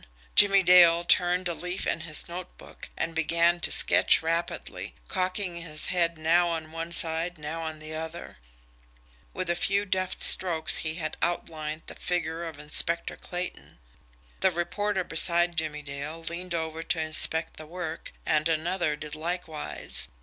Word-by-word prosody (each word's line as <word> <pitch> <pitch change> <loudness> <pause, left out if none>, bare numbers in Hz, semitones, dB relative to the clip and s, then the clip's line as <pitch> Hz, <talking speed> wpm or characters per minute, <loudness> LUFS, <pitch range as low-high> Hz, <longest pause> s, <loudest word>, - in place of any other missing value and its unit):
Jimmie 195 -1 +6
Dale 175 -1 +6
turned 180 +1 +2
a 170 - -2
leaf 180 +3 -5
in - - -1
his 155 -2 -4
notebook 175 +1 -10
and 165 +1 -2
began 170 +2 +1
to - - -1
sketch - - +3
rapidly, 165 +1 -4
cocking 185 -1 -2
his 155 -2 0
head 170 -2 0
now 170 +3 +2
on 160 -2 -5
one 165 +1 -6
side 165 +1 +5
now 155 +2 -6
on 160 -1 -6
the 155 0 -8
other. 160 - -7 0.9
With 185 -1 -5
a 175 - 0
few 200 +3 -1
deft 185 -1 -1
strokes 170 -4 +5
he 155 0 -2
had 155 -3 -5
outlined 155 -2 -3
the - - -8
figure 170 -1 -3
of 160 -3 -8
Inspector 155 +3 +2
Clayton. 175 - -7 0.6
The 190 - +3
reporter 185 +3 -2
beside 170 +1 +3
Jimmie 155 -2 -3
Dale 145 +3 -7
leaned 170 +1 -5
over 160 -1 -4
to 165 - -2
inspect 160 +1 +3
the 155 - -9
work, 165 -1 -7
and 155 +1 +1
another 165 0 -1
did 150 0 -10
likewise. 160 - -2
165 Hz, 155 wpm, -26 LUFS, 160-175 Hz, 0.9 s, Jimmie